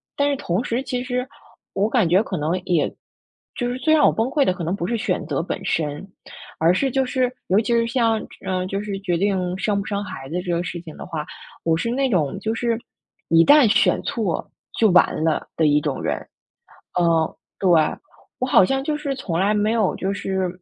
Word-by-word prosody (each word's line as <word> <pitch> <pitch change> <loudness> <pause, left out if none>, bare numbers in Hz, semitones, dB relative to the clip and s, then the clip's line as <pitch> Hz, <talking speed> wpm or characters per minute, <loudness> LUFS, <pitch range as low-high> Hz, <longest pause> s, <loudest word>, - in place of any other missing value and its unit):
但 285 0 +2
是 - - +1
同 180 +2 -1
时 240 +2 -1
其 250 -1 -3
实 250 0 -2 0.5
我 200 +2 +1
感 225 -8 +2
觉 185 +5 +4
可 185 -5 -4
能 160 +5 -1
也 170 -4 +2 0.7
就 245 -1 -1
是 245 - -3
最 310 +3 +3
让 305 -1 +5
我 - - +4
崩 225 +2 0
溃 285 +1 +2
的 - - +3
可 175 - -6
能 170 +4 -1
不 175 -3 -3
是 235 - 0
选 235 +3 -1
择 - - -1
本 - - -4
身， 150 +3 -2 0.5
而 165 +2 +4
是 270 +9 +1
就 265 +1 +1
是 255 -1 0 0.2
尤 190 +3 +4
其 230 - -3
是 230 0 +3
像， 230 -2 +1 0.3
呃， 185 -1 -1
就 195 +1 -2
是 200 -2 -4
决 180 -3 0
定 185 -1 0
生 200 +1 0
不 200 - -4
生 205 -1 -2
孩 140 -9 -8
子 175 +4 -2
这 180 -1 -4
个 170 0 0
事 170 0 -5
情 160 -3 -11
的 - - -8
话， 160 -4 -4 0.4
我 165 -1 +2
是 230 +8 -2
那 265 +2 +1
种 160 - 0
就 220 +1 -2
是 230 -1 0 0.5
“一 165 0 +6
旦 290 -4 +7
选 205 - +3
错 210 -8 -2 0.3
就 220 - +5
完 180 -3 +4
了” 160 -1 0
的 160 - +3
一 145 0 +4
种 145 -3 -2
人， - - 0 0.9
嗯， 165 -2 +2 0.2
对， 190 - +2 0.7
我 255 - -1
好 220 -7 +6
像 270 +6 0
就 300 +1 -1
是 285 -2 -2
从 170 -10 -3
来 200 +3 +2
没 210 +1 +1
有 230 -2 +1
就 195 +1 -2
是， 190 -2 -2
200 Hz, 240 characters per minute, -22 LUFS, 175-240 Hz, 0.9 s, 旦